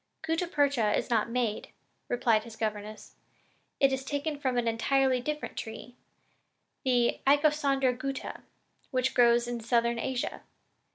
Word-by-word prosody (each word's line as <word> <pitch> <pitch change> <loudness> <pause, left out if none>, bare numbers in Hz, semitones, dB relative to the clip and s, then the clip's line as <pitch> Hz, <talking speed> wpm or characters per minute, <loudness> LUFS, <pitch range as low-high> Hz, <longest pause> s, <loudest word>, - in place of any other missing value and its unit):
"Gutta 330 +2 -1
percha 280 -9 +2
is - - -3
not 230 0 +2
made," 230 -3 -1 0.4
replied 230 -3 +2
his 230 -1 -11
governess, 215 -1 -5 0.7
"and 275 -1 +4
it - - 0
is 265 0 -2
taken 285 +2 -3
from 260 -3 -1
an 240 -1 +1
entirely 255 +3 +2
different 300 +3 -4
tree, 235 +2 -7 0.9
the 245 -2 +2
Icosandra 280 -3 +3
gutta, 270 +1 -5 0.5
which 255 0 0
grows 235 0 +4
in 240 -1 -3
Southern 235 0 +1
Asia. 255 +1 -3
250 Hz, 135 wpm, -29 LUFS, 235-275 Hz, 0.9 s, and